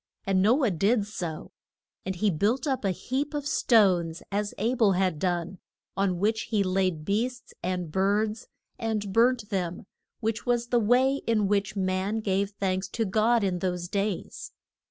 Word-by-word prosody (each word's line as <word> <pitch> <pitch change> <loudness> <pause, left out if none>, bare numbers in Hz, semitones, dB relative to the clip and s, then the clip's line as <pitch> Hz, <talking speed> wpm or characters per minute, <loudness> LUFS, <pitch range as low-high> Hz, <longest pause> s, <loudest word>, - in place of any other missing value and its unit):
And 195 -1 +2
No 250 +8 +4
ah 220 - +2
did 200 +5 +2
so, 175 -6 -6 0.6
and 190 - -2
he 205 +3 +1
built 210 - 0
up 265 -5 -1
a 195 - +1
heap 270 - -2
of 290 -1 -3
stones 185 - +3
as 205 +1 -2
A 225 +5 0
bel 220 -6 +3
had 180 -4 0
done, 175 0 -2 0.4
on 195 -2 +1
which 215 +4 0
he 210 -3 +2
laid 185 -4 0
beasts 245 +6 -2
and 180 -2 -3
birds, 210 +4 0 0.3
and 215 -4 -2
burnt 230 -1 +3
them, 180 -3 -2 0.3
which 220 -1 -2
was 240 -1 0
the 245 - +3
way 250 +5 +3
in 215 -3 +2
which 200 0 0
man 190 +2 -1
gave 195 -1 0
thanks 190 -2 -2
to 225 +3 -2
God 220 +3 +2
in 185 -2 0
those 180 -1 -2
days. 200 0 -3
200 Hz, 170 wpm, -27 LUFS, 185-225 Hz, 0.6 s, No